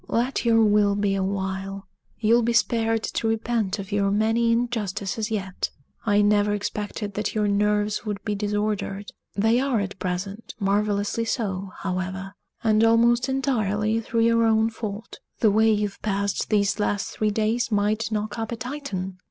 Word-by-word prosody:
"Let 245 +2 0
your 225 -1 +5
will 205 -1 +4
be 200 -1 +1
a 195 - 0
while 195 0 -3 0.3
you'll 235 +2 +4
be 235 +1 +1
spared 225 -1 +2
to 225 - -2
repent 225 -2 0
of 200 0 -7
your 200 -1 +2
many 225 +3 +2
injustices 220 -3 -1
yet! 195 -4 -2 0.4
I 205 0 +4
never 205 0 +3
expected 205 0 -4
that 210 +2 -2
your 210 -1 +2
nerves 210 +1 +1
would 205 -3 -5
be 210 - 0
disordered 205 -1 -2 0.2
they 225 +4 +3
are, 265 -4 +1
at 200 0 -4
present, 190 +4 -4
marvelously 205 +2 0
so, 195 -5 -2
however; 190 +1 -3 0.3
and 220 -1 +3
almost 235 +3 +4
entirely 220 -5 0
through 230 +1 -1
your 230 0 +4
own 225 0 +3
fault. 220 0 -6 0.2
The 215 - +4
way 220 +2 +4
you've 205 -2 -1
passed 200 -1 -1
these 205 -1 +2
last 205 -1 0
three 215 - 0
days 220 +3 0
might 215 +2 +1
knock 215 +2 -2
up 225 0 -3
a - - -1
Titan. 220 -7 -5
210 Hz, 160 wpm, -24 LUFS, 200-225 Hz, 0.4 s, your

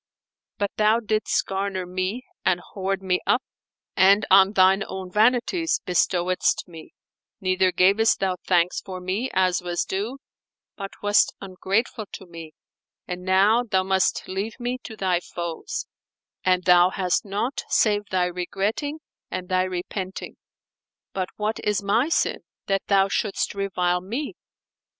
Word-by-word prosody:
But 200 -1 -1
thou 215 +2 +4
didst 215 -1 0
garner 195 -1 -2
me 185 +7 -3 0.2
and 185 -2 +2
hoard 195 +1 -4
me 180 -1 +1
up - - +3 0.5
and 200 +2 +5
on 195 +1 +7
thine 190 +1 +5
own 190 -1 -6
vanities 245 - +2
bestowedst 180 0 +1
me, 165 -2 -12 0.4
neither 185 -1 +2
gavest 200 +5 +3
thou 190 -2 0
thanks 175 -1 +2
for 185 -1 -7
me, 190 +8 -2
as 185 -1 +2
was 175 -1 -1
due, 210 +8 -3 0.6
but 195 -1 -6
wast 205 0 +3
ungrateful 200 +4 -2
to 190 - -8
me; 165 -3 -10 0.5
and 180 -1 -5
now 195 +5 +4
thou 190 -6 0
must 190 0 +1
leave 200 +6 -4
me 245 +1 -3
to 220 - -8
thy 185 -3 +1
foes 170 -2 -5 0.6
and 185 0 +2
thou 180 0 +6
hast 185 +1 0
naught 210 +6 -2
save 210 -1 +2
thy 185 -1 +1
regretting 200 - -3 0.3
and 185 0 -5
thy 185 0 +2
repenting. 185 +1 -4 0.8
But 185 -2 -2
what 215 +1 -2
is 210 -1 0
my 225 +9 +2
sin, - - +1 0.3
that 195 -1 0
thou 195 -1 +4
shouldest 200 +1 -1
revile 180 -3 0
me?" 240 +11 -4
190 Hz, 140 wpm, -24 LUFS, 185-210 Hz, 0.8 s, on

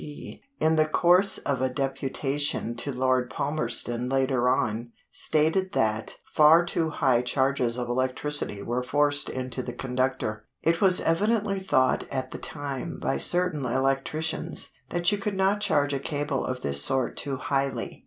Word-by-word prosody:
P.), 145 -1 -9 0.2
in 160 0 +2
the 155 0 +3
course 180 +5 +4
of 135 -3 -2
a 130 - +1
deputation 135 -1 -1
to 140 +4 -3
Lord 130 -1 +1
Palmerston 125 -3 -1
later 130 -2 +1
on, 115 -1 -1 0.2
stated 160 +5 +1
that 110 0 -1
"far 160 +3 +5
too 165 -1 -1
high 130 -5 +2
charges 130 -2 0
of 120 -1 -3
electricity 130 -3 -1
were 120 +2 -1
forced 145 +2 0
into 130 0 -4
the 120 -1 -6
conductor. 125 -4 -2 0.2
It 165 0 +1
was 185 -2 +6
evidently 205 +3 +1
thought 130 -9 +1
at 130 -1 -4
that - - -7
time 145 +3 -5
by - - -1
certain 180 -5 +2
electricians 135 +6 -1 0.2
that 175 +1 +1
you 205 - -1
could 205 0 -3
not 195 +2 +1
charge 145 -8 +2
a 140 - -1
cable 145 -1 -2
of 130 0 -4
this 70 0 +1
sort 130 - 0
too 140 -2 -3
highly. 135 +1 -2
135 Hz, 155 wpm, -26 LUFS, 125-160 Hz, 0.2 s, was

